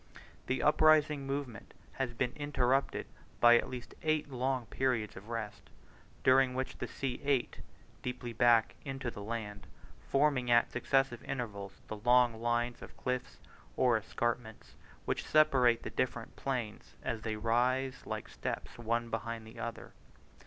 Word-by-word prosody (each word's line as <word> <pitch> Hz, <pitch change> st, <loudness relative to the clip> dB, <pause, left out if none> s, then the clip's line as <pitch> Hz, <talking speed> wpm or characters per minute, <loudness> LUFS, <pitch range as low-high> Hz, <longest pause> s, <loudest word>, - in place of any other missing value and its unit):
The 130 Hz, -, 0 dB
uprising 150 Hz, -2 st, +4 dB
movement 135 Hz, -4 st, -5 dB, 0.2 s
has 130 Hz, -2 st, -2 dB
been 125 Hz, 0 st, 0 dB
interrupted 135 Hz, -2 st, +1 dB, 0.3 s
by 120 Hz, 0 st, +8 dB
at -, -, -4 dB
least 125 Hz, -1 st, -7 dB
eight 155 Hz, -2 st, 0 dB
long 130 Hz, -1 st, -1 dB
periods 115 Hz, -3 st, -1 dB
of 100 Hz, +4 st, -11 dB
rest, 115 Hz, -3 st, -5 dB, 0.5 s
during 130 Hz, 0 st, +5 dB
which 130 Hz, 0 st, -3 dB
the -, -, -3 dB
sea 130 Hz, -3 st, -4 dB
ate, 140 Hz, -3 st, 0 dB, 0.4 s
deeply 125 Hz, -1 st, -4 dB
back 115 Hz, -1 st, +4 dB
into 135 Hz, -3 st, -4 dB
the 105 Hz, -, -8 dB
land, 105 Hz, -1 st, -5 dB, 0.4 s
forming 135 Hz, -3 st, +2 dB
at 120 Hz, 0 st, +4 dB
successive 135 Hz, -1 st, +1 dB
levels 100 Hz, -6 st, -5 dB
the 110 Hz, -, -5 dB
long 120 Hz, 0 st, +4 dB
lines 120 Hz, +1 st, 0 dB
of -, -, -11 dB
cliffs, 125 Hz, 0 st, -3 dB, 0.4 s
or 125 Hz, -2 st, +4 dB
escarpments, 110 Hz, +1 st, -3 dB, 0.3 s
which -, -, -1 dB
separate 130 Hz, -6 st, +4 dB
the -, -, -5 dB
different 120 Hz, -2 st, -2 dB
plains 120 Hz, -6 st, -4 dB
as 115 Hz, -2 st, -2 dB
they 110 Hz, -1 st, -2 dB
rise 125 Hz, +4 st, +1 dB
like -, -, -4 dB
steps -, -, -5 dB
one 115 Hz, 0 st, -1 dB
behind 115 Hz, 0 st, -3 dB
the 110 Hz, -, -12 dB
other. 115 Hz, -, -6 dB
125 Hz, 145 wpm, -33 LUFS, 115-135 Hz, 0.5 s, by